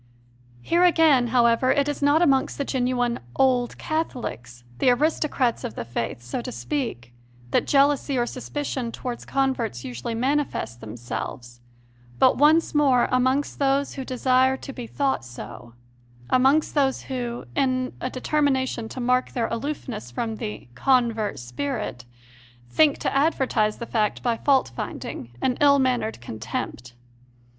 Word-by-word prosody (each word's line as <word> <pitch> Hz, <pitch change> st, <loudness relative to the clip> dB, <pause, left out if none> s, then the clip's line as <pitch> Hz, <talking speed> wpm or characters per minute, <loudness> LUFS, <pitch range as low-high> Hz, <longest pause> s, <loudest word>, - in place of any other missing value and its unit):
Here, 345 Hz, +1 st, +3 dB
again, 320 Hz, -8 st, +5 dB
however, 235 Hz, +1 st, +3 dB
it 280 Hz, 0 st, +2 dB
is 290 Hz, -1 st, -3 dB
not 290 Hz, +4 st, +4 dB
amongst 270 Hz, -5 st, +2 dB
the 280 Hz, -, -2 dB
genuine 245 Hz, -2 st, 0 dB, 0.2 s
"old 250 Hz, -2 st, +2 dB
Catholics 125 Hz, -, -4 dB
" 120 Hz, -, -22 dB
the -, -, +4 dB
aristocrats 265 Hz, -2 st, +1 dB
of 240 Hz, -, -5 dB
the -, -, -5 dB
Faith, 115 Hz, 0 st, -4 dB
so 120 Hz, -, -4 dB
to 250 Hz, -, -6 dB
speak 230 Hz, -, -4 dB, 0.4 s
that -, -, +2 dB
jealousy 280 Hz, -1 st, +3 dB
or 240 Hz, -, +2 dB
suspicion 255 Hz, -1 st, -4 dB
towards 245 Hz, 0 st, -6 dB
converts 260 Hz, -, -1 dB
usually 125 Hz, -, -4 dB
manifest 260 Hz, -, -1 dB
themselves, 120 Hz, +2 st, -7 dB, 0.6 s
but, -, -, +5 dB
once 310 Hz, +4 st, +4 dB
more, 275 Hz, -5 st, +4 dB
amongst 260 Hz, +3 st, +1 dB
those 275 Hz, 0 st, +1 dB
who 270 Hz, -, -5 dB
desire 260 Hz, +1 st, +2 dB
to 275 Hz, -, -8 dB
be 245 Hz, -2 st, -7 dB
thought 275 Hz, -, -1 dB
so 120 Hz, -1 st, -10 dB, 0.6 s
amongst 270 Hz, +4 st, +3 dB
those 275 Hz, -3 st, +1 dB
who, 245 Hz, -3 st, -4 dB
in 255 Hz, -2 st, 0 dB
a 255 Hz, -, -2 dB
determination 260 Hz, -4 st, 0 dB
to -, -, -7 dB
mark 250 Hz, +1 st, +1 dB
their 235 Hz, -2 st, 0 dB
aloofness 240 Hz, -, -4 dB
from 220 Hz, -, -3 dB
the 210 Hz, -, -6 dB
"convert 230 Hz, -, +1 dB
spirit," 120 Hz, -1 st, -4 dB, 0.7 s
think 305 Hz, -2 st, +4 dB
to -, -, -2 dB
advertise 265 Hz, -7 st, +1 dB
the 235 Hz, -, -5 dB
fact 215 Hz, -3 st, -1 dB
by 240 Hz, -2 st, +1 dB
fault 265 Hz, -, +2 dB
finding 115 Hz, -, -6 dB
and 250 Hz, -1 st, +1 dB
ill 285 Hz, -1 st, +6 dB
mannered 250 Hz, -, 0 dB
contempt. 120 Hz, +1 st, -5 dB
255 Hz, 145 wpm, -24 LUFS, 220-275 Hz, 0.7 s, ill